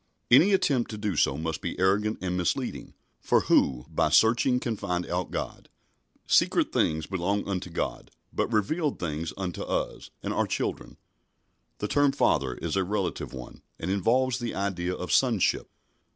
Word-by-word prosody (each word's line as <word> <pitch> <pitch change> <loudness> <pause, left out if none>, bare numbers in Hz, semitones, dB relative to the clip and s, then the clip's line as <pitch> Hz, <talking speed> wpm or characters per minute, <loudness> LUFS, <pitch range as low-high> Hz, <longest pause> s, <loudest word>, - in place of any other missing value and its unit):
Any 170 +11 +7
attempt 140 -10 +2
to 110 - -6
do 105 -3 -2
so 70 -2 +2
must 80 0 -3
be - - -4
arrogant 100 +3 +2
and 90 -1 -1
misleading, 90 -2 -2 0.2
for - - +2
who 65 -2 +2
"by - - +1
searching 120 +3 +4
can 120 -3 -2
find 90 -4 -2
out 90 0 -2
God"? - - -5 0.6
Secret - - +3
things 80 0 +1
belong 95 +3 -1
unto 95 -2 -3
God, 85 - -4 0.2
but - - -1
revealed 145 - 0
things 80 -1 -3
unto 95 -3 -4
us - - -3
and - - -2
our - - +1
children. - - -3 0.8
The 105 - -3
term 145 +3 +3
"Father" 65 - +1
is - - -3
a 95 - +2
relative 95 -1 -2
one 65 -2 -10 0.2
and 90 - -3
involves 125 +6 +2
the 120 -2 -4
idea 90 -2 -2
of 90 - -5
sonship. 120 -8 +2
95 Hz, 165 wpm, -27 LUFS, 90-115 Hz, 0.8 s, Any